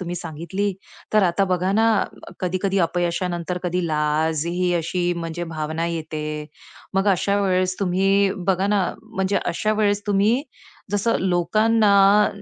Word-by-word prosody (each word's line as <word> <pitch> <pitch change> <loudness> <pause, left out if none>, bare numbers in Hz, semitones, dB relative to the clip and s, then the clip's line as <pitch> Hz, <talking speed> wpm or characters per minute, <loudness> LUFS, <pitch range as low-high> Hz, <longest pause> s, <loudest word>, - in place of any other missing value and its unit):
तुम्ही 175 -1 -4
सांगितली. 175 +5 -3 0.4
तर 215 - +4
आता 185 +2 +2
बघा 180 +1 +1
ना, 220 +2 +3 0.6
कधी-कधी 185 +2 0
अपयशानंतर 175 0 -2
कधी 180 0 -1
लाज 155 0 0
ही 175 +1 0
अशी 175 +1 0
म्हणजे 170 0 -4
भावना 160 +1 -2
येते. 155 -2 -4 0.5
मग 195 +1 +2
अशा 200 +1 +2
वेळेस 185 -1 +1
तुम्ही, 195 +1 +2 0.2
बघा 190 0 +2
ना, 205 -1 +2 0.2
म्हणजे 200 -3 -2
अशा 215 +5 0
वेळेस 205 -1 +1
तुम्ही 205 +6 +2 0.5
जसं 205 +3 +1
लोकांना 200 +2 +4
185 Hz, 130 wpm, -22 LUFS, 170-200 Hz, 0.6 s, तर